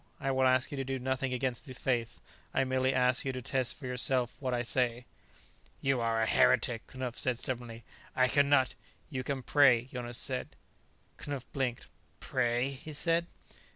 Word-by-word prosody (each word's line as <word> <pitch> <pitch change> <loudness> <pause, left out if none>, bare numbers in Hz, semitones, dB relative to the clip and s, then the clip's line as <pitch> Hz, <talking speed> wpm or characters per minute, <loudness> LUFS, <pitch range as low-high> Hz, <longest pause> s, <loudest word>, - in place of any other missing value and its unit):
I 135 -1 -1
will 130 0 +3
ask 130 0 +2
you 145 - -4
to 135 - -1
do 135 0 -3
nothing 130 0 -1
against 125 +1 -2
the 130 - -7
Faith; 120 -3 -1 0.4
I - - +4
will 130 - -1
merely 130 0 +2
ask 125 -1 +2
you 135 - -1
to 130 - -5
test 130 0 -1
for 140 - -9
yourself 125 0 +1
what 130 -2 -2
I 120 -1 0
say." 125 0 +1 0.7
"You 135 -2 +1
are 115 -1 +1
a 110 - +3
heretic," 115 +1 +3
Knupf 130 -2 -5
said 125 -2 +2
stubbornly. 120 -2 -4 0.3
"I 130 0 +4
can 140 +2 +3
not 130 -3 +4 0.2
" - - -34
"You 130 -2 -3
can 135 0 -3
pray," 130 -5 +5
Jonas 120 -2 -6
said. 130 -2 -2 0.6
Knupf 140 -3 -5
blinked. 130 -4 -2 0.3
"Pray?" 120 +1 0
he 140 +3 -9
said. 170 +3 +1
130 Hz, 190 wpm, -31 LUFS, 125-135 Hz, 0.7 s, pray